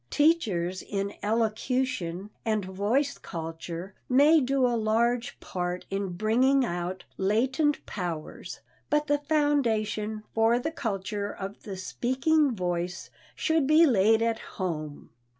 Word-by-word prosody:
Teachers 205 Hz, -, +2 dB
in 200 Hz, 0 st, -3 dB
elocution 215 Hz, -3 st, -1 dB
and 215 Hz, -3 st, 0 dB
voice 220 Hz, +10 st, 0 dB
culture 165 Hz, +2 st, -6 dB, 0.2 s
may 290 Hz, +5 st, +6 dB
do 265 Hz, 0 st, +2 dB
a 245 Hz, -, +2 dB
large 230 Hz, +2 st, +1 dB
part 180 Hz, 0 st, -4 dB
in 195 Hz, -2 st, -2 dB
bringing 250 Hz, +8 st, +3 dB
out 175 Hz, -1 st, -3 dB, 0.2 s
latent 260 Hz, +9 st, +1 dB
powers, 170 Hz, -5 st, -5 dB, 0.3 s
but 300 Hz, 0 st, +2 dB
the 290 Hz, -1 st, +1 dB
foundation 225 Hz, -8 st, 0 dB
for 225 Hz, +1 st, +4 dB
the 280 Hz, +6 st, -2 dB
culture 205 Hz, -, -3 dB
of 195 Hz, +1 st, -7 dB
the 195 Hz, -3 st, -7 dB
speaking 260 Hz, +7 st, +1 dB
voice 175 Hz, -1 st, -3 dB, 0.2 s
should 320 Hz, -4 st, +1 dB
be 310 Hz, +3 st, +7 dB
laid 225 Hz, -3 st, +4 dB
at 230 Hz, -1 st, 0 dB, 0.2 s
home. 155 Hz, -6 st, -4 dB
220 Hz, 120 wpm, -28 LUFS, 190-265 Hz, 0.3 s, be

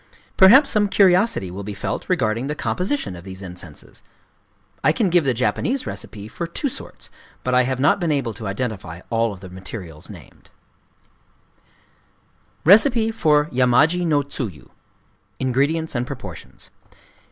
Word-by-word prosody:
Perhaps 260 Hz, +10 st, +7 dB
some 210 Hz, -1 st, +2 dB
curiosity 190 Hz, -, +3 dB
will 95 Hz, +3 st, -6 dB
be 100 Hz, 0 st, -6 dB
felt 100 Hz, -, -4 dB
regarding 120 Hz, -7 st, 0 dB
the 150 Hz, -, -3 dB
composition 185 Hz, -, -2 dB
of 85 Hz, -, -11 dB
these 95 Hz, 0 st, -9 dB
incenses. 90 Hz, -4 st, -11 dB, 0.8 s
I -, -, +5 dB
can 195 Hz, 0 st, 0 dB
give 175 Hz, -3 st, +3 dB
the 130 Hz, -, +2 dB
Japanese 245 Hz, -, -1 dB
recipes 105 Hz, 0 st, -8 dB
for 170 Hz, -, -4 dB
two 270 Hz, -, -3 dB
sorts; -, -, -9 dB, 0.3 s
but 125 Hz, -, -1 dB
I 125 Hz, 0 st, +4 dB
have 130 Hz, 0 st, -2 dB
not 145 Hz, +8 st, +3 dB
been 170 Hz, -4 st, 0 dB
able 135 Hz, -6 st, -1 dB
to 105 Hz, +1 st, -7 dB
identify 100 Hz, -5 st, -4 dB
all 115 Hz, -1 st, +1 dB
of 95 Hz, -2 st, -10 dB
the 95 Hz, -, -10 dB
materials 95 Hz, -4 st, -9 dB
named:— -, -, -14 dB, 2.2 s
Recipe 225 Hz, -, +5 dB
for 150 Hz, -9 st, +3 dB
Yamaji 130 Hz, +8 st, +3 dB
no 145 Hz, -3 st, +2 dB
Tsuyu. 115 Hz, -, -7 dB, 0.7 s
Ingredients 140 Hz, +5 st, 0 dB
Proportions. 95 Hz, -, -9 dB
130 Hz, 140 wpm, -21 LUFS, -, 2.2 s, Perhaps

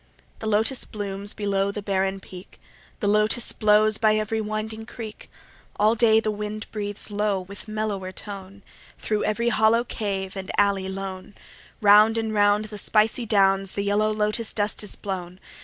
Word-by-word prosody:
8 -, -, -28 dB
The 220 Hz, -, -4 dB
Lotos 220 Hz, +5 st, +1 dB
blooms 200 Hz, -1 st, -4 dB
below 200 Hz, -1 st, 0 dB
the 205 Hz, 0 st, -6 dB
barren 195 Hz, -1 st, 0 dB
peak: 185 Hz, -1 st, -12 dB, 0.4 s
The 205 Hz, -, 0 dB
Lotos 215 Hz, +3 st, +2 dB
blows 215 Hz, 0 st, +3 dB
by 215 Hz, -1 st, +4 dB
every 215 Hz, +1 st, -1 dB
winding 215 Hz, +1 st, -4 dB
creek: 220 Hz, -3 st, -9 dB, 0.5 s
All 215 Hz, +2 st, +4 dB
day 220 Hz, -1 st, +4 dB
the 220 Hz, -1 st, -1 dB
wind 210 Hz, +1 st, -5 dB
breathes 205 Hz, -1 st, -4 dB
low 205 Hz, -2 st, 0 dB
with 200 Hz, +4 st, -10 dB
mellower 215 Hz, -3 st, -3 dB
tone: 195 Hz, 0 st, -8 dB, 0.3 s
Thro' 215 Hz, -1 st, -1 dB
every 230 Hz, +3 st, 0 dB
hollow 220 Hz, +1 st, +3 dB
cave 195 Hz, -5 st, -3 dB
and 190 Hz, 0 st, -6 dB
alley 200 Hz, -2 st, +2 dB
lone 190 Hz, 0 st, -6 dB, 0.5 s
Round 210 Hz, +2 st, +6 dB
and 225 Hz, -1 st, -1 dB
round 205 Hz, 0 st, +3 dB
the 210 Hz, -1 st, -8 dB
spicy 225 Hz, +3 st, +1 dB
downs 195 Hz, -2 st, +3 dB
the 200 Hz, -, -1 dB
yellow 210 Hz, +1 st, +2 dB
Lotos 215 Hz, +1 st, -1 dB
dust 205 Hz, -1 st, -2 dB
is 210 Hz, -, -5 dB
blown. 185 Hz, -2 st, -6 dB
210 Hz, 165 wpm, -24 LUFS, 195-215 Hz, 0.5 s, Round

